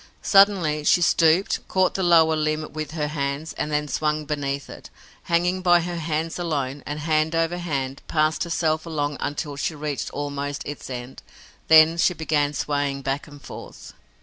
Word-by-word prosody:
Suddenly 190 -7 +4
she 175 - +4
stooped, 170 +2 +3
caught 185 -1 +2
the 195 - -2
lower 165 -3 +5
limb 155 0 -1
with 155 -1 -4
her 150 -2 -1
hands 140 +1 -3
and 150 - -3
then 150 0 0
swung 150 +1 -1
beneath 140 -2 -3
it, - - -11 0.4
hanging 175 +2 +1
by 175 -1 +4
her 175 0 -4
hands 160 +1 -3
alone, 145 -5 -2
and, 150 +1 -4
hand 155 +1 +1
over 165 +2 0
hand, 140 -6 -3
passed 155 0 +1
herself 160 -1 -1
along 145 -3 -2
until 145 0 -3
she 155 +3 -2
reached 150 -1 -4
almost 145 0 -4
its 145 -1 -7
end. 125 0 -7 0.5
Then 160 +1 +7
she 180 - +3
began 150 -2 0
swaying 140 0 -2
back 135 +3 -2
and 145 -1 -13
forth. - - -11
155 Hz, 170 wpm, -23 LUFS, 145-165 Hz, 0.5 s, Then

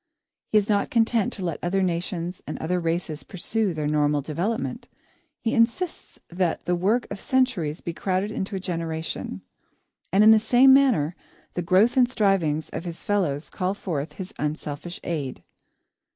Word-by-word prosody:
He 215 - +5
is 205 -1 +2
not 205 -2 +1
content 230 -2 +2
to 190 - -4
let 170 -3 -2
other 190 +2 +1
nations 175 0 -2
and - - -4
others 180 +3 -1
races 165 -2 -2
pursue 205 +2 -1
their 155 -3 -3
normal 150 -1 +2
development. 175 - -3 0.5
He 225 - 0
insists 235 +10 0
that 175 -1 -1
the 180 - +1
work 200 +8 +1
of 195 - -5
centuries 220 - 0
be 170 - -4
crowded 190 +4 -1
into 195 -1 -3
a - - -2
generation. 160 - -4 0.7
And 195 +4 +5
in 220 - +9
the 220 - +7
same 250 +4 +6
manner, 225 - +4 0.4
the 175 - -2
growth 190 +8 +3
and 250 -1 +5
strivings 180 - +1
of - - -4
his 170 -1 -6
fellows 170 -8 -1
call 185 +1 -1
forth 160 -7 -4
his 190 +2 -8
unselfish 150 +3 -4
aid. 145 -6 -4
180 Hz, 165 wpm, -25 LUFS, 160-215 Hz, 0.7 s, in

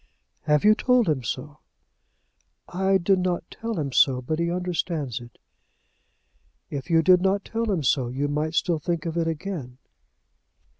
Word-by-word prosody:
"Have 150 -1 +3
you 210 +1 +7
told 250 0 +2
him 150 -5 +1
so?" 145 +5 -5 1.1
"I 190 +1 +1
did 190 +1 +2
not 180 -2 -1
tell 225 -4 -4
him 140 -3 -2
so, 130 0 +4
but 155 +6 -3
he 170 0 0
understands 170 - -2
it." 120 -1 -14 1.3
"If 140 +3 -5
you 165 -1 +4
did 180 +1 +5
not 195 +1 +1
tell 230 0 -2
him 175 -6 -1
so, 130 -1 +2
you 135 +4 -2
might 150 +2 -2
still 170 -2 +1
think 170 +1 -3
of 165 -1 -3
it 165 -1 0
again." 160 -6 -5
165 Hz, 160 wpm, -25 LUFS, 145-185 Hz, 1.3 s, you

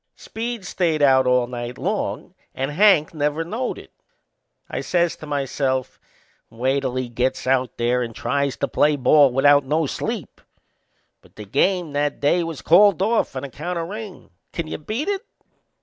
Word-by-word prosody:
Speed 230 -2 -6
stayed 165 -5 0
out 130 -2 +5
all 125 -1 +3
night 120 0 -6
long 200 -1 -3 0.2
and 135 +2 -2
Hank 175 -2 +4
never 150 +1 -1
knowed 225 +9 -3
it. - - -13 0.8
I - - -4
says 175 -2 0
to 155 - -10
myself: 135 -2 -2 0.5
"Wait 130 +4 0
till 130 -2 -3
he 130 -1 -2
gets 125 +2 -2
out 130 -1 0
there 120 +1 +1
and 115 -2 -5
tries 140 -1 -1
to 140 - -1
play 150 +2 +2
ball 140 +1 +5
without 145 +2 +5
no 150 +4 0
sleep!" - - -5 0.8
But - - -23
the 105 - -9
game 165 - 0
that 145 0 -1
day 160 +5 +2
was 165 -3 -6
called 195 +1 +5
off 225 -7 0
on 130 - -4
account 150 +6 -5
o' 165 - -2
rain. 205 - -8 0.2
Can 170 - -4
you 155 - -6
beat 220 - -4
it? 405 +1 -1
145 Hz, 170 wpm, -22 LUFS, 130-175 Hz, 0.8 s, out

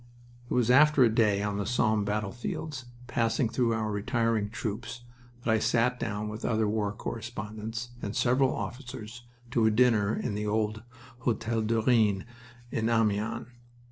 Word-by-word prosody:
It - - -1
was 125 -1 +3
after 145 +1 +6
a 115 -2 +4
day 105 -3 +3
on 105 -1 -1
the 100 - -1
Somme 110 -3 +2
battlefields, 120 +7 -3 0.2
passing 120 0 +1
through 115 0 +1
our 110 -1 -1
retiring 110 0 0
troops, 115 +2 -5 0.4
that 115 - +1
I 110 - +3
sat 120 +2 +2
down, 105 -2 -3
with 105 +2 -6
other 110 -2 +1
war 105 -1 0
correspondents 110 +1 -5
and 100 +1 -4
several 130 +2 +3
officers, 120 -2 -6 0.3
to 115 -2 +3
a - - +6
dinner 110 -2 +3
in 120 - -2
the 105 +1 -2
old 110 0 0 0.4
Hotel 115 -1 0
du 110 +1 +1
Rhin 110 -6 +3 0.5
in 110 0 0
Amiens. 115 0 +1
115 Hz, 155 wpm, -29 LUFS, 105-120 Hz, 0.5 s, after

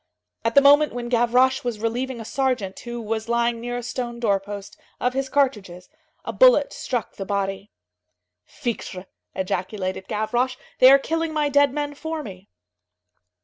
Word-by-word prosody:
At 230 0 -1
the 280 - +7
moment 290 +2 +6
when 240 0 -5
Gavroche 250 +2 +3
was 240 -3 -2
relieving 235 +3 -3
a 225 - -7
sergeant, 250 -8 -1
who 240 0 -6
was 220 0 -4
lying 235 0 +1
near 245 +1 -4
a 245 - -5
stone 240 -1 -4
door 205 -4 +2
post, 200 0 -8 0.2
of 250 +1 0
his 270 0 -2
cartridges, 210 -11 -1 0.4
a - - -4
bullet - - +5
struck 245 -3 -4
the 195 - -4
body. 195 0 -3 0.7
"Fichtre!" 195 - -5 0.3
ejaculated 190 0 -3
Gavroche. 245 +4 -1 0.2
"They 255 - +9
are 275 - +8
killing 325 +3 -2
my 300 -1 +1
dead 285 -1 +4
men 290 +1 -3
for 320 +1 -5
me." 190 -4 -11
240 Hz, 160 wpm, -23 LUFS, 210-270 Hz, 0.7 s, They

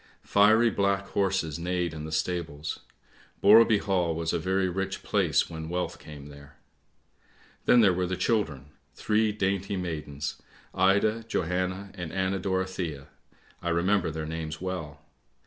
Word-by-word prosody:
Fiery 110 +3 +5
black 100 0 0
horses 95 -6 0
neighed 90 -1 -1
in 75 -1 -6
the 80 - -7
stables; 80 -2 -3 0.6
Borreby 110 +2 +7
Hall 90 -5 0
was 80 0 -2
a - - +1
very 95 +3 +1
rich 95 +2 -3
place - - +2
when 80 -1 -7
wealth 90 +1 -3
came 75 -2 -11
there. 70 0 -14 0.5
" - - -32
Then 120 - +6
there 100 -4 +5
were 90 0 -1
the 95 0 -2
children, 80 - -1 0.2
three 110 0 +1
dainty 100 -1 -1
maidens, 75 -5 -4 0.3
Ida, 100 +4 +2
Johanna 95 +2 -2
and 85 -5 -6
Anna 95 0 -1
Dorothea. 95 -6 -3 0.5
I 85 - -2
remember 85 +1 +2
their 80 0 -4
names 80 0 -5
well. 80 -6 -5
90 Hz, 145 wpm, -27 LUFS, 80-100 Hz, 0.6 s, Borreby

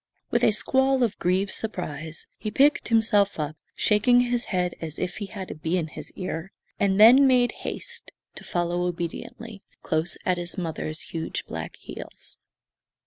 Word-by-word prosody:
With - - +2
a - - +7
squall 265 +4 +2
of 215 -3 -1
grieved 190 +2 +1
surprise 160 -7 -5
he 215 - -3
picked 275 +6 +3
himself 215 -5 +3
up, 150 0 -2 0.2
shaking 245 +4 +4
his 245 -1 +1
head 180 -2 0
as 160 -2 -5
if 180 - -3
he 205 - -4
had 190 -1 -7
a - - -3
bee 160 +4 -1
in 160 -3 -2
his - - -9
ear, 185 -1 -5 0.3
and 195 0 +2
then 250 +6 +9
made 250 -2 +4
haste - - -6 0.2
to - - -10
follow 175 0 -1
obediently, 185 +5 -6 0.2
close 160 +2 0
at 180 -1 +1
his 175 +3 -5
mother's 160 -3 -3
huge 160 -1 -4
black - - -6
heels. - - -10
190 Hz, 165 wpm, -26 LUFS, 170-225 Hz, 0.3 s, then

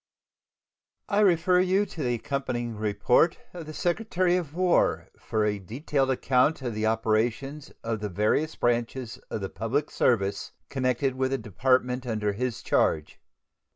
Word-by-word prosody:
I 205 - +2
refer 180 -2 +4
you 190 +3 +3
to 165 - -8
the 120 -3 0
accompanying 120 -2 -3
report 105 - +2 0.2
of 170 -3 -8
the 155 - -7
Secretary 180 -1 +1
of 165 -4 -3
War 180 -1 +2
for 110 -1 -1
a 105 -1 0
detailed 135 - -1
account 130 +2 +2
of 120 -2 -2
the 110 +1 0
operations 115 +6 -1
of 115 -1 -2
the 105 0 -3
various 105 - 0
branches 120 0 -1
of 110 - -4
the 95 - -3
public 135 +7 -2
service 100 -5 0 0.2
connected 130 0 0
with 130 0 0
the 135 - 0
Department 125 +3 0
under 105 -3 -1
his 125 +2 -3
charge. 75 -1 +1
125 Hz, 150 wpm, -27 LUFS, 110-150 Hz, 0.2 s, refer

